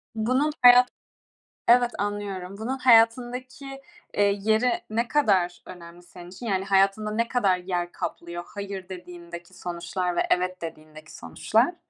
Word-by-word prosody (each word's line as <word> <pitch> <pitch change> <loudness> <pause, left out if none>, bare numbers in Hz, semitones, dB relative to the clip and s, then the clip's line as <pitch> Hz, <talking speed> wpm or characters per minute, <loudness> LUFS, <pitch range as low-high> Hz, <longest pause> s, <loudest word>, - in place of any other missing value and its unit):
Bunun 255 +7 +1
hayat 245 0 +8 0.8
evet 245 0 +5
anlıyorum, 200 -2 -4
bunun 240 +5 -3
hayatındaki, 250 +3 +2 0.3
eee, 205 - +2 0.2
yeri 220 +3 +2 0.2
ne 230 +2 -1
kadar 185 -12 +1
önemli 175 -1 -12
senin 175 0 -13
için, 190 +7 -10
yani, 195 -3 -1
hayatında 195 +2 +2
ne 230 +2 0
kadar 200 -7 +1
yer 180 -1 -3
kaplıyor 170 0 -6
"hayır" 200 -2 -7
dediğindeki 175 -1 -10
sonuçlar 175 +1 -4
ve - - +2
"evet" 185 0 0
dediğindeki 155 -1 -10
sonuçlar? 80 -1 0
195 Hz, 130 wpm, -25 LUFS, 175-235 Hz, 0.8 s, hayat